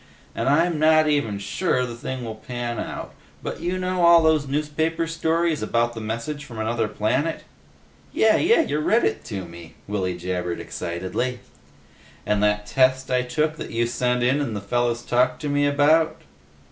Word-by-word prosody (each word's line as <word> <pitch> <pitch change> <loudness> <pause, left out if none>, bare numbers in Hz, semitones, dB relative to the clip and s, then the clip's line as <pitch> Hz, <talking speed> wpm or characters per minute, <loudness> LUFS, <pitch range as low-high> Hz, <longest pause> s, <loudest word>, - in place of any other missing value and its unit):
And - - -1
I'm 165 +2 +2
not 155 0 +5
even 145 -9 +1
sure 125 - 0
the 120 - -6
thing 125 +1 -5
will 110 - -4
pan 120 +2 -5
out, - - -6 0.3
but - - -5
you 175 +2 -1
know 185 0 -1
all 170 -1 +7
those 155 -3 +3
newspaper 155 +3 -1
stories 165 0 0
about 120 0 0
messages 115 +7 -4
from 120 -6 -10
another 110 0 -1
planet?" 130 +10 -1 0.7
"Yeh! 220 0 +4
Yeh! 355 +1 +4
Ya 150 - -1
read 220 +9 +2
it 110 - -1
to 100 -6 -5
me!" 85 -1 -12
Willy 95 -3 -2
jabbered 90 -1 -3
excitedly. 95 +9 -3 0.9
"And 105 -1 +1
that 105 0 +1
test 130 +3 +2
I 125 0 +3
took 155 +5 -1
that - - -6
you 115 +1 0
sent 125 +1 0
in 130 +4 +2
and 115 -7 -3
the - - -2
fellas 120 +3 -1
talked 125 +1 +1
to 145 - -1
me 145 0 +2
about?" 150 +3 +3
125 Hz, 170 wpm, -23 LUFS, 110-155 Hz, 0.9 s, all